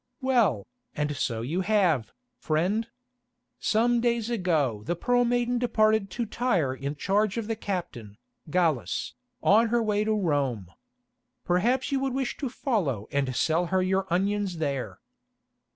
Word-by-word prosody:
"Well, 230 - +2 0.3
and 150 0 -1
so 115 -2 -2
you 165 +10 -1
have, 180 - +2 0.3
friend. 185 +9 0 0.7
Some 235 +2 +2
days 235 -1 0
ago 160 - 0
the 175 - 0
Pearl 245 +7 +2
Maiden 245 0 +1
departed 220 -4 +2
to 235 +5 -3
Tyre 200 - 0
in 140 +2 -4
charge 200 +6 0
of 230 - -2
the 225 +1 -2
captain, 170 - -5 0.3
Gallus, 160 -7 0 0.3
on 225 +3 +5
her 235 +1 +1
way 210 -1 +1
to 220 0 +1
Rome. 140 - -1 0.7
Perhaps 235 +11 +1
you 275 - +1
would 265 -1 -1
wish 265 -2 -1
to 275 - -3
follow 175 - -1
and 135 -3 -1
sell 165 +6 +1
her 185 +1 +1
your 190 +1 0
onions 195 0 0
there." 140 -5 -3
195 Hz, 145 wpm, -27 LUFS, 150-230 Hz, 0.7 s, on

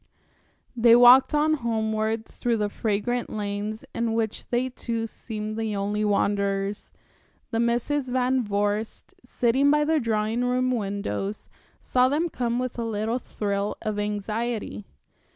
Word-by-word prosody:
They 235 0 +6
walked 245 +4 +7
on 305 +1 +3
homeward 220 -3 -1
through 235 0 -2
the 210 -1 0
fragrant 220 +4 -1
lanes, 210 +1 -4
in 230 -1 -1
which 225 -1 -2
they 250 +1 0
two 230 -2 -3
seemed 215 -1 -6
the 220 -2 -2
only 205 +1 -1
wanderers. 200 -1 0 0.6
The 225 - 0
Misses 245 +4 0
Van 255 0 +1
Vorst, 205 +1 -2
sitting 260 +3 +2
by 300 +1 +3
the 315 0 +2
drawing 225 0 0
room 255 +1 +1
windows, 200 - -3 0.3
saw 255 0 +3
them 315 +5 0
come 240 -4 -1
with 250 -1 -3
a - - -1
little 225 +2 -1
thrill 205 -3 -3
of 215 -1 -2
anxiety. 210 +1 -3
225 Hz, 135 wpm, -25 LUFS, 210-245 Hz, 0.6 s, walked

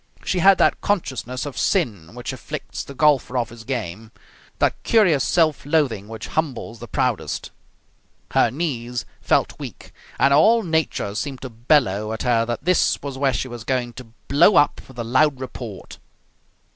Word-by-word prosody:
She 185 - 0
had 195 +2 +6
that - - +2
consciousness 130 - -2
of 145 - -6
sin 105 - -1
which - - -5
afflicts - - -6
the 140 - -11
golfer 140 -3 +2
off 120 -2 -1
his 115 0 -12
game, 110 -4 -5 0.5
that - - +1
curious 180 - +3
self 160 -4 +2
loathing 135 -9 0
which 110 0 -8
humbles 130 -7 -3
the - - -8
proudest. - - -2 0.8
Her - - +4
knees 125 -7 -3 0.2
felt - - +1
weak - - -9 0.2
and 135 +2 +4
all 220 +10 +5
nature 160 - -1
seemed 135 +4 -4
to 130 - -6
bellow 110 -4 +1
at 110 - -4
her 115 -2 +2
that 120 +4 -4
this 180 -1 +3
was 140 -2 -5
where 140 -1 +3
she 130 - -2
was 120 -3 -8
going 120 -1 -1
to 125 - -10 0.2
blow 170 +8 +5
up 145 - +3
with 130 - -15
a 120 - -2
loud 130 +4 +2
report. 120 -5 -8
130 Hz, 170 wpm, -22 LUFS, 115-150 Hz, 0.8 s, had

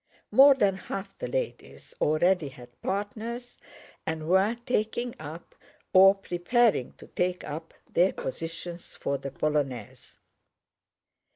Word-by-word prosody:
More 275 +1 +8
than 195 -7 +2
half 195 +1 -6
the - - -3
ladies - - -4
already 170 +2 +3
had 125 -2 -14
partners 225 +5 -4 0.4
and 160 -1 -3
were 190 +6 +3
taking 240 +1 -1
up, 155 +2 -9 0.4
or 195 +1 +8
preparing 195 - +1
to - - -14
take 180 0 -1
up, 160 +2 -6 0.2
their 180 +3 +4
positions 165 +4 -6
for 140 0 -2
the 140 - -5
polonaise. 140 -6 -3
180 Hz, 115 wpm, -28 LUFS, 155-210 Hz, 0.4 s, More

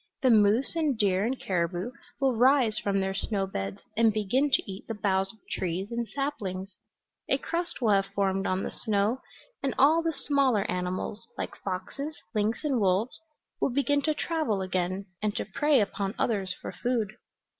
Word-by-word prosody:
The 255 - +6
moose 220 +7 +4
and 305 -6 +1
deer 195 -3 +2
and 255 +3 -1
caribou 180 +4 -1 0.3
will 270 -3 +2
rise 245 -2 +4
from 200 -1 0
their 195 0 0
snow 195 0 -1
beds 100 - -4
and 225 0 +5
begin 220 +7 +1
to 265 - +3
eat 195 0 -8
the 225 - -3
boughs 195 -2 +1
of 225 - -21
trees 185 +4 -2
and 235 0 -2
saplings; 200 -10 -3 0.5
a - - +4
crust 340 -3 -3
will 220 - +4
have 195 -1 +3
formed 195 -1 0
on 185 +1 0
the - - -3
snow, 215 +3 0 0.4
and 270 -5 -1
all 310 +5 +6
the 330 0 0
smaller 275 -8 +2
animals, 185 +5 -3
like - - -4
foxes, 240 +11 -5 0.2
lynx 215 +6 0
and 275 -5 +1
wolves, 210 +10 +1 0.4
will - - +2
begin 280 +2 +2
to 305 +2 +1
travel 295 - 0
again, 185 +1 -1 0.2
and 210 -1 0
to - - -2
prey 290 +7 +3
upon 200 -1 -1
others 195 -5 0
for - - -6
food. 235 -5 -1
215 Hz, 175 wpm, -28 LUFS, 195-265 Hz, 0.5 s, The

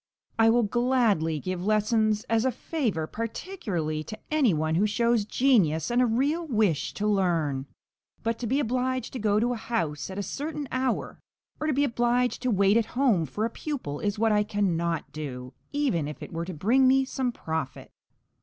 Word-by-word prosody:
I 225 0 +6
will 240 +1 +4
gladly 220 - +1
give 185 +2 -4
lessons 215 +1 +2
as 225 0 +1
a 260 - +2
favour, 235 - -2
particularly 205 - -4
to 215 - -7
any 295 -8 +4
one 155 -1 0
who 195 +6 +3
shows 235 0 +1
genius 205 - +2
and 245 +1 +3
a 250 - +4
real 285 +9 0
wish 210 - +1
to 210 - -2
learn. 165 -9 +1 0.6
But 230 0 -1
to 240 - -3
be 265 +5 +1
obliged 255 0 -1
to 255 - -4
go 210 -1 +2
to 240 +2 +1
a - - -4
house 165 - -2
at 190 - -7
a 200 - -2
certain 295 +4 -4
hour, 255 -1 -1 0.4
or 305 - -2
to 305 - +2
be 280 +2 +2
obliged 245 -1 +1
to 255 - 0
wait 200 0 +4
at 230 - +2
home 220 - +3
for 210 - -2
a 230 - -2
pupil, 245 - -4
is 205 0 -1
what 225 +1 +2
I 210 0 +4
cannot 170 -6 -1
do, 125 -4 -6 0.2
even 265 - 0
if 150 - -7
it - - -9
were 165 +1 -3
to 185 - -6
bring 245 - +3
me 265 +1 +4
some 260 -1 -2
profit. 160 - -5
220 Hz, 190 wpm, -27 LUFS, 170-250 Hz, 0.6 s, I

